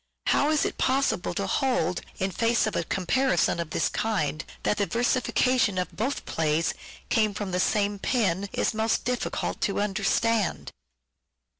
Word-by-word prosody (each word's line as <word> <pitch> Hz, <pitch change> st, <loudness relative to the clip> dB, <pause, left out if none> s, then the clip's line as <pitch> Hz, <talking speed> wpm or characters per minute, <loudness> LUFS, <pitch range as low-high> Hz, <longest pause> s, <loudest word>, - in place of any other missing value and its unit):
How 290 Hz, -, +3 dB
it 310 Hz, -1 st, +2 dB
is -, -, 0 dB
possible 270 Hz, +2 st, +1 dB
to -, -, -1 dB
hold, 180 Hz, -, 0 dB, 0.2 s
in 190 Hz, 0 st, -1 dB
face 230 Hz, +3 st, +2 dB
of 215 Hz, -, -2 dB
a -, -, 0 dB
comparison 185 Hz, 0 st, +1 dB
of 170 Hz, -2 st, -3 dB
this -, -, 0 dB
kind, 155 Hz, -9 st, -1 dB, 0.2 s
that 210 Hz, -, +1 dB
the 200 Hz, -, +1 dB
versifica 250 Hz, +1 st, +1 dB
tion 205 Hz, -5 st, +2 dB
of 180 Hz, -2 st, -1 dB
both 260 Hz, +8 st, -2 dB
plays 160 Hz, 0 st, 0 dB, 0.4 s
came 215 Hz, -3 st, +2 dB
from 205 Hz, -2 st, -4 dB
the 180 Hz, -, 0 dB
same 205 Hz, +1 st, +1 dB
pen, 200 Hz, -5 st, 0 dB
is -, -, 0 dB
most 220 Hz, +1 st, 0 dB
difficult 250 Hz, 0 st, -2 dB
to 200 Hz, -, 0 dB
understand. 210 Hz, +1 st, 0 dB
210 Hz, 160 wpm, -26 LUFS, 185-240 Hz, 0.4 s, How